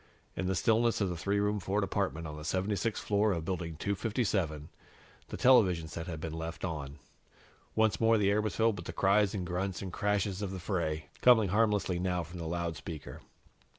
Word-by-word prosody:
In 95 - -2
the 95 - 0
stillness 115 +3 +2
of 100 -3 +1
the 90 - -3
three 100 +4 0
room 105 +1 +1
Ford 100 +3 0
apartment 95 -4 -1
on 75 -1 -6
the 75 - -8
76th 95 +7 -1
floor 105 +1 +1
of 85 -2 -3
Building 85 -3 -3
257, 100 - -1 0.6
the - - -6
television 95 -11 +4
set 80 +2 -6
had 80 -3 -5
been 80 0 -5
left 80 +1 -5
on. 75 -5 -5 0.8
Once 110 0 +2
more 115 0 +5
the 100 -1 +3
air 105 +1 +2
was 110 - -3
filled 110 -2 +2
with - - -8
the - - -5
cries 100 +1 +3
and 95 -3 -3
grunts 90 +1 -2
and 95 -2 -6
crashes 100 -1 0
of 100 - -2
the 95 - -5
fray, 85 -4 -2
coming 115 -5 +6
harmlessly 105 -3 +2
now 90 -1 0
from 85 +2 -9
the 80 - -4
loudspeaker. 80 -3 -5
95 Hz, 195 wpm, -31 LUFS, 85-105 Hz, 0.8 s, coming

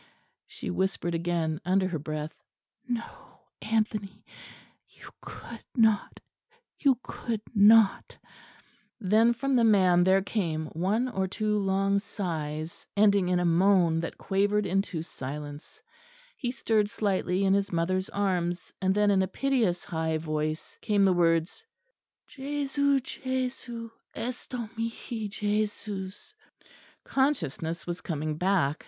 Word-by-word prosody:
she - - -6
whispered 190 -2 -1
again 165 -2 -1
under 185 +2 +2
her 165 -4 -2
breath. 155 +1 -4 0.5
"No, 240 -2 -6 0.2
Anthony! 215 -2 -2 0.6
you - - -14
could 235 -2 -10
not, 220 -4 +2 0.6
you 275 -4 +4
could 225 -3 -4
not!" 215 0 +5 0.8
Then 220 +3 +4
from 275 +3 0
the 240 - +4
man 185 -5 +5
there 190 +1 +4
came 165 -7 -1
one 200 +9 +1
or 190 -6 -1
two 210 +3 -1
long 195 0 +2
sighs, 160 -6 -5
ending 200 -3 +4
in 180 -1 +2
a 180 - +1
moan 170 -1 +4
that 165 - -4
quavered 205 +2 +1
into 190 -4 -1
silence; 145 0 -8 0.5
he 245 - -3
stirred 220 -4 +1
slightly 195 -3 0
in 190 - +4
his 200 0 +1
mother's 185 +2 0
arms; 180 -3 -1
and 190 0 +2
then 210 0 +4
in 195 -1 +4
a 190 - +1
piteous 240 -10 0
high 160 -3 -1
voice 155 0 -3
came 205 -2 +2
the 190 -1 +5
words 165 - +1 0.6
"Jesu... 280 0 0
Jesu... 250 -3 -4 0.2
esto 245 -1 -4
mihi... 230 -1 -4
Jesus." 205 -2 -3 0.7
Consciousness 170 - -1
was 175 0 -4
coming 155 -2 -3
back. 175 -4 +1
195 Hz, 125 wpm, -28 LUFS, 170-220 Hz, 0.8 s, not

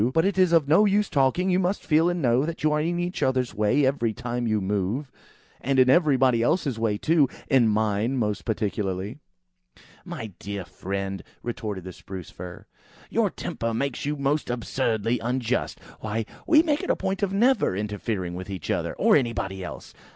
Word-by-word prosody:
But 160 - +4
it 195 -1 +1
is 185 -2 +5
of 165 -4 +4
no 175 +8 +5
use 205 0 +2
talking! 150 +7 +2
You 180 - +3
must 190 +2 -1
feel 160 +2 +4
and 175 -3 -2
know 120 +1 +3
that 165 +1 -4
you 155 - +3
are 150 0 +1
in 170 +2 -1
each 175 +1 -3
other's 130 -2 +1
way 105 +7 +2
every 125 -4 +1
time 120 0 -3
you 110 -1 +1
move; 105 +8 -2 0.5
and 135 +1 0
in 130 0 +6
everybody 130 -7 +4
else's 135 -2 +1
way 110 -2 +1
too. 155 +1 +3 0.2
In 130 -4 +5
mine, 110 +3 +1
most 105 -4 -1
particularly." 105 +1 -2 0.8
"My 110 -3 -7
dear 100 -2 -5
friend," 95 +1 -4 0.2
retorted 105 -5 -4
the 95 0 -8
Spruce 95 -2 -9
fir, 90 -1 -9 0.5
"your - - +2
temper 115 0 -4
makes 140 +1 -2
you 145 +1 -1
most 140 +1 0
absurdly 120 -1 -1
unjust. 125 +1 -1 0.2
Why, 110 +1 -2 0.2
we 320 -2 +6
make 305 -2 +1
a - - +3
point 195 +1 -2
of 200 -2 0
never 235 - +3
interfering 105 -3 -3
with 90 +2 -7
each 95 -2 -4
other, - - -1
or - - +2
with - - +7
anybody 95 -6 -3
else! 90 - -8
125 Hz, 185 wpm, -25 LUFS, 105-155 Hz, 0.8 s, with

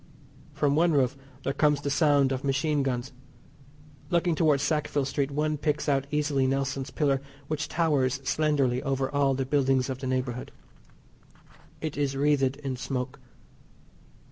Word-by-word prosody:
From 145 -1 +1
the 165 +4 +4
roof 135 -5 +2 0.3
there 135 - -1
comes 150 0 +3
the 145 0 -3
sound 140 -2 +3
of 130 0 -2
machine 140 +2 +1
guns. 130 0 -2 1.0
Looking 175 -1 +2
towards 150 -3 +2
Sackville 150 -3 0
Street 140 0 -1
one 150 +1 -1
picks 150 0 -1
out 140 -1 +1
easily 145 -3 +1
Nelson's 135 0 -1
Pillar, 140 -3 +1 0.3
which 155 0 -2
towers 140 -5 +1
slenderly 140 -4 +1
over 135 -1 -1
all 140 -2 +2
the 135 0 -1
buildings 135 -1 +1
of 130 - -5
the 130 - -4
neighbourhood. 130 -1 -2 1.3
It 155 -2 -4
is 140 -1 0
wreathed 140 -2 +2
in 130 -2 -3
smoke. 130 0 -4
140 Hz, 145 wpm, -27 LUFS, 135-150 Hz, 1.3 s, the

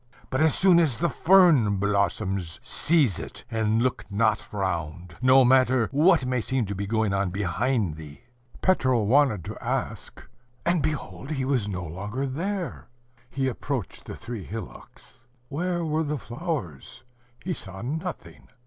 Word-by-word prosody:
But 130 - 0
as 160 -1 +4
soon 185 -2 +6
as 150 -8 +2
the 170 -1 0
fern 160 - +5
blossoms, 100 -2 -1
seize 140 - +2
it, - - -8
and 110 0 +1
look 130 - -1
not 110 +2 0
round, 85 -3 -3
no 130 +1 +6
matter 130 -2 +4
what 155 +1 +4
may 125 -1 0
seem 130 0 -1
to 100 - -4
be 100 +1 -4
going 110 -1 +1
on 95 -1 0
behind 100 - -1
thee." 75 +1 -11 0.4
Petro 130 - +3
wanted 115 - +3
to - - -8
ask - - -4 0.4
and 170 -2 +2
behold 150 -2 -4
he 135 -4 -2
was 130 -6 0
no 90 -3 -4
longer 105 - -4
there. 175 +4 -4 0.4
He 135 -1 -1
approached 130 -3 -4
the - - -7
three 115 -3 -7
hillocks 115 +4 -10 0.3
where 175 +3 -2
were 155 0 0
the 150 -1 -2
flowers? 120 - -5 0.4
He 180 - -1
saw 95 - -8
nothing. 160 +8 -6
125 Hz, 150 wpm, -26 LUFS, 100-150 Hz, 0.4 s, soon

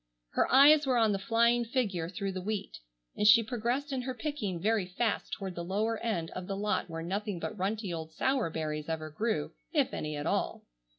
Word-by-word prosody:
Her - - +1
eyes 290 +2 +7
were 255 -2 +3
on 225 -2 +4
the 195 - 0
flying 235 +3 +3
figure 210 -9 -1
through 195 +1 -3
the 185 -1 -4
wheat, 205 +1 -4 0.4
and 210 - +2
she 230 +2 +8
progressed 245 +5 -2
in 260 - -1
her 255 0 -4
picking 230 - -3
very 210 0 +1
fast 205 +4 -1
toward 190 -2 -4
the 170 - -5
lower 215 +5 -1
end 175 -8 -2
of 185 0 -6
the 195 - -3
lot 205 -2 -1
where 165 0 -5
nothing 195 +1 -3
but 215 - -4
runty 200 0 -2
old 160 -1 -5
sour 260 +2 0
berries 155 -1 -3
ever 155 -1 -3
grew, 160 -2 -1 0.2
if - - +2
any 155 0 -3
at 145 - -4
all. - - -1
205 Hz, 205 wpm, -31 LUFS, 175-235 Hz, 0.4 s, she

